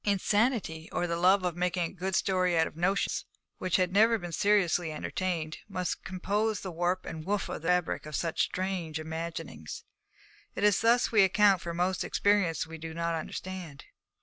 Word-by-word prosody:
Insanity, 205 -4 +1
or 175 - 0
the 170 -1 -1
love 185 +3 +4
of 180 -2 -1
making 180 0 0
a 165 - -4
good 190 0 -3
story 185 -2 +2
out 160 - +4
of - - -8
notions 185 +4 0 0.4
which 185 -1 0
have 180 -1 +2
never 225 +4 +5
been 175 -4 -7
seriously 180 -3 +2
entertained, 160 0 -3
must 185 -2 -3
compose 205 +3 -1
the 190 - -5
warp 175 +2 -1
and 160 -1 -6
woof 200 +3 -1
of - - -5
the 165 - -5
fabric 180 -3 +1
of 150 - -5
such 165 -2 -1
strange 180 -4 -2
imaginings. 160 - -6 0.7
It - - -3
is 210 -2 +4
thus 235 +2 +3
we 215 -3 +6
account 195 0 +4
for 170 -1 -5
most 180 +1 0
experiences 200 -6 +1
we 160 0 -9
do 160 0 -7
not 170 0 -1
understand. 165 -2 -6
180 Hz, 180 wpm, -29 LUFS, 165-195 Hz, 0.7 s, we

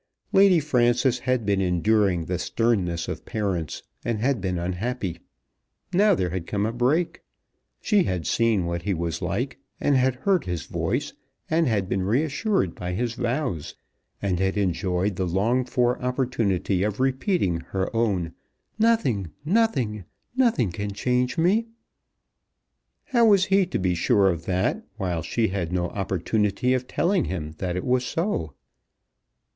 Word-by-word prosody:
Lady 195 -3 +6
Frances 125 -3 +2
had 125 -4 +1
been 100 -1 +1
enduring 90 -1 +2
the 90 +1 -2
sternness 90 -7 0
of - - -5
parents, 95 -8 -3 0.2
and 115 -2 -1
had 125 -1 +1
been 90 -1 -1
unhappy. 90 +1 -3 0.7
Now 200 +2 +5
there 90 - -1
had 90 -2 -4
come 100 0 0
a 110 - -2
break. 135 +8 +1 0.6
She 205 -4 +3
had 90 -3 -2
seen 110 -5 +2
what 85 0 -2
he 95 +2 -1
was 85 0 -3
like, - - -2 0.2
and 145 - +2
had 130 0 +3
heard 185 +7 +1
his 90 -5 -3
voice, - - -2 0.4
and 120 - +2
been 95 0 -1
reassured 135 - 0
by 90 0 -5
his 115 +4 -1
vows, 120 - -2 0.5
and 95 -3 0
had 95 +1 0
enjoyed 95 0 0
the 95 - 0
longed 115 +8 +1
for 125 0 +1
opportunity 120 -8 0
of 105 +2 -1
repeating 130 - +1
her 95 +6 -3
own. 95 -8 0 0.5
"Nothing, 175 - +2 0.2
nothing, 140 - +1 0.3
nothing 230 - +2
can 100 +3 -4
change 125 +6 0
me!" 200 +8 +2 1.4
How 235 -5 +3
was 200 -3 +5
he 195 -1 +3
to - - -2
be 90 -1 +1
sure 95 +3 +3
of 85 -1 -5
that 95 0 0
while 90 -5 -2
she 110 +7 0
had 95 -3 -3
no 90 -1 0
opportunity 100 +5 0
of 130 0 -1
telling 180 0 +1
him 75 -5 -4
that 90 -2 -2
it 90 - -3
was 125 0 +2
so? 125 - -2
105 Hz, 150 wpm, -25 LUFS, 90-130 Hz, 1.4 s, Lady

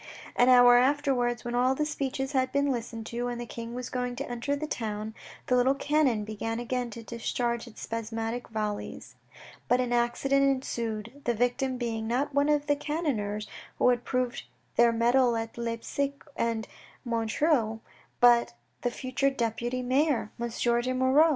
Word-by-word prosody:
An 245 +1 +5
hour 245 -1 +8
afterwards, 255 -2 +2
when 240 - -3
all 250 +2 +3
the 300 - 0
speeches 275 -2 -2
had 260 -2 +1
been 280 0 +2
listened 230 -2 -4
to, 240 +2 -3
and 240 -1 -3
the 240 - -4
King 235 0 -7
was 250 0 -5
going 250 -1 -2
to 275 +3 -4
enter 245 +4 -2
the 295 +2 -3
town, 215 -6 -4 0.3
the 250 - +2
little 255 +2 +4
cannon 280 -7 +2
began 220 +2 -3
again 245 0 -2
to 230 +1 -9
discharge 235 +1 -2
its 230 - -12
spasmodic 225 +1 -3
volleys. 215 -2 -4 0.5
But 245 - +3
an 245 -1 0
accident 240 +3 +2
ensued, 235 -2 -2
the 240 - +1
victim 250 +3 0
being, 225 -2 -2
not 270 +5 0
one 285 +1 +3
of 295 -1 +2
the 290 0 +2
cannoneers 240 -10 -2 0.3
who - - +4
had 245 -1 +1
proved 255 -2 -2 0.3
their 235 0 +5
mettle 240 +1 +3
at 225 0 -4
Leipsic 235 +4 -3
and 230 -2 -1
at - - -23 0.3
Montreuil, 230 0 +1 0.4
but 240 - +5 0.3
the 245 - +1
future 255 +2 0
deputy 240 0 -2
mayor, 255 -3 +1
M. 235 0 -2
de 240 +2 +1
Moirod. 265 +5 +5
245 Hz, 170 wpm, -28 LUFS, 230-265 Hz, 0.5 s, hour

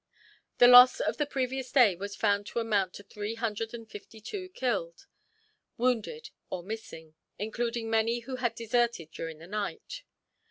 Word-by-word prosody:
The 245 - +8
loss 250 +1 +9
on - - 0
the 295 - +1
previous 265 -2 -3
day 240 -9 +5
was 200 +3 -6
found 205 -1 +1
to - - -3
amount 205 -5 0
to 200 - -10
three 210 +2 -5
hundred 225 -1 -3
and 230 -2 -9
fifty 220 +1 -11
two 370 - -6
killed, 210 - -3 0.7
wounded, 250 - -1 0.2
or 175 - -5
missing; 185 -6 -8 0.2
including 230 +2 -3
many 225 +1 +1
who 255 +2 -6
had 240 -3 -1
deserted 230 -8 0
during 165 -1 -6
the 160 - -12
night. 215 - -5
225 Hz, 160 wpm, -29 LUFS, 205-245 Hz, 0.7 s, loss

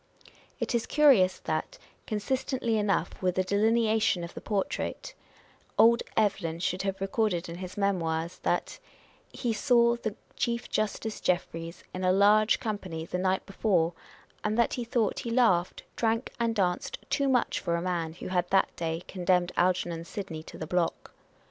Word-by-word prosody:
It - - -2
is 235 -1 0
curious 265 -12 +5
that, - - -3 0.3
con 215 - -1
sistently 250 0 -1
enough 205 -2 0
with 180 -1 +1
the 185 - +2
delineation 215 -1 +2
in 170 - -6
the - - -8
portrait, 205 -3 -3 0.6
old 235 +2 +6 0.2
Evelyn 195 -6 +1
should 180 +1 -1
have 195 -1 -2
recorded 195 -2 0
in 170 0 -7
his 185 +1 -7
Memoirs, 170 -4 -1
that - - -1 0.3
" - - -30 0.2
he 240 -3 -2
saw 235 +1 +4
the 220 -3 -4 0.2
Chief 235 0 -1
Justice 215 +1 -2
Jeffries 170 -1 -2
in 185 - -4
a 185 - +4
large 210 +3 +5
company 190 -8 -4
the 180 - -3
night 185 0 0
before, 180 -4 +1 0.5
and 215 +1 0
that 235 - +3
he 245 - -2
thought 230 -2 0
he 235 - -4
laughed, 225 -8 +2
drank 230 +1 0
and 230 -1 +1
danced 180 -4 0
too 280 -1 +2
much 250 -2 +2
for 170 - -1
a - - 0
man 170 -3 -2
who 175 - -7
had 180 -1 0
that 195 - +2
day 165 0 -3
condemned 180 -1 +1
Algernon 175 -2 +1
Sidney 170 -4 -6
to - - -11
the 155 - -5
block." 175 +1 -1
195 Hz, 165 wpm, -28 LUFS, 175-225 Hz, 0.6 s, old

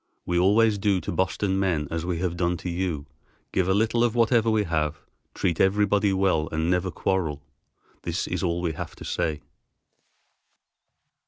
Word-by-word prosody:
We 85 0 +1
always 105 +3 +4
do 95 -1 +2
to - - -5
Boston 95 +2 0
men 85 -7 0
as 80 +1 -3
we 90 -2 -1
have 90 0 -2
done 85 0 0
to 90 - -5
you, 85 -5 -2 0.5
give 95 -1 +1
a - - +4
little 110 +3 +2
of 120 -1 +1
whatever 115 -1 +3
we 110 -1 +2
have, 75 -4 -1 0.4
treat 85 -4 0
everybody 100 +1 +3
well 95 -5 +1
and 80 +2 0
never 90 +1 +1
quarrel. 80 -7 -1 0.6
This - - -2
is - - -3
all 85 0 0
we 85 -2 0
have - - -7
to - - -10
say." 80 -3 -1
90 Hz, 170 wpm, -25 LUFS, 85-100 Hz, 0.6 s, always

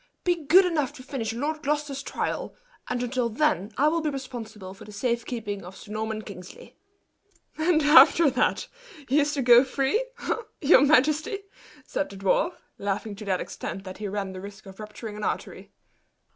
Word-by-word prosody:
"Be 350 -4 0
good 365 +5 +7
enough 300 -6 0
to 265 -4 -11
finish 255 -5 -3
Lord 295 +7 -3
Gloucester's 290 -1 -2
trial; - - -3 0.3
and 250 0 -1
until 245 -1 -1
then 230 -4 0
I 290 - +4
will 330 +2 +1
be 310 - 0
responsible 230 -8 -7
for 195 - -13
the 210 - -11
safekeeping 225 -2 -3
of 180 +2 -10
Sir 210 - -12
Norman 220 0 -3
Kingsley." 180 -4 -11 0.8
"And 315 0 +2
after 305 +2 +7
that, 255 - 0 0.4
he 275 +4 +3
is 295 0 +1
to 275 - 0
go 240 0 +8
free 275 - 0 0.2
eh, - - +2 0.2
your 290 -2 +6
majesty?" 305 +6 +3 0.4
said 290 - -2
the 195 - -10
dwarf, 195 - +1 0.3
laughing 200 +1 -3
to 215 - -8
that 190 -2 0
extent 195 - -6
that 185 0 -9
he 210 - -3
ran 195 -1 -3
the 185 - -7
risk 200 0 -10
of 195 +1 -12
rupturing 215 0 -8
an 210 - -6
artery. - - -4
245 Hz, 180 wpm, -26 LUFS, 210-295 Hz, 0.8 s, go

